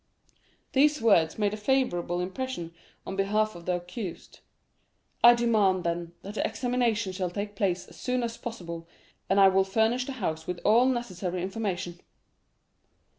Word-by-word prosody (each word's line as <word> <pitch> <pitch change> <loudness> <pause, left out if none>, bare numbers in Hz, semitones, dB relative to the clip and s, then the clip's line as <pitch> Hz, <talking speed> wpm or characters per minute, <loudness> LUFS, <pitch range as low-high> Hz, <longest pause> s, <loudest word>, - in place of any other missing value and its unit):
These 295 +2 +4
words 185 -9 +3
made 205 -1 +1
a - - -3
favorable 205 -8 0
impression 185 -3 -4 0.3
on 190 - -5
behalf 210 +2 +1
of 170 -1 -12
the 180 - +2
accused. 180 +1 -7 0.8
"I 240 0 +9
demand, 210 -6 +2
then, 170 0 -3
that 200 - -7
the - - -1
examination 240 -5 0
shall 185 -1 -2
take 205 +3 -5
place 185 -3 0
as - - -16
soon 250 -1 -1
as 230 -1 -3
possible, 170 -9 -7 0.4
and 195 - +4
I 195 - +8
will 190 0 +4
furnish 220 +6 +1
the 275 - -4
house 160 -10 -3
with 180 -1 -3
all 235 +4 +5
necessary 185 -8 -2
information." 185 -3 -3
200 Hz, 155 wpm, -28 LUFS, 180-235 Hz, 0.8 s, I